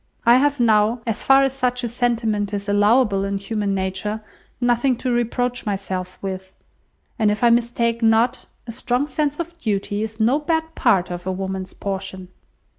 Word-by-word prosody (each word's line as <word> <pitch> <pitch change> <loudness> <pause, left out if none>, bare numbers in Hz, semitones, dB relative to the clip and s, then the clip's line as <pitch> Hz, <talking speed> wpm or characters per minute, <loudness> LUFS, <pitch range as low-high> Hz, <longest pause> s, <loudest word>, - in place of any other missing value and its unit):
I 235 +1 +7
have 285 +1 +2
now, 225 0 +3
as 225 -1 -2
far 270 0 +6
as 270 -1 +1
such 250 -2 -1
a - - 0
sentiment 225 -4 -1
is 200 +1 -5
allowable 205 0 +3
in 200 0 -1
human 200 0 -2
nature, 195 +3 -3 0.4
nothing 245 +1 +2
to 250 +1 -2
reproach 245 +1 -1
myself 190 -3 -4
with; 190 -1 -6 0.6
and 215 -2 +3
if 210 +3 -1
I 235 - +6
mistake 235 0 +1
not, 225 +2 +2 0.2
a 235 - -6
strong 250 +3 -1
sense 295 0 -2
of 340 0 -5
duty 205 -4 -2
is 220 0 -5
no 240 +7 +3
bad 320 +1 -1
part 180 - +2
of 175 +1 -6
a - - 0
woman's 190 0 -4
portion." 190 -2 -5
225 Hz, 175 wpm, -21 LUFS, 200-245 Hz, 0.6 s, I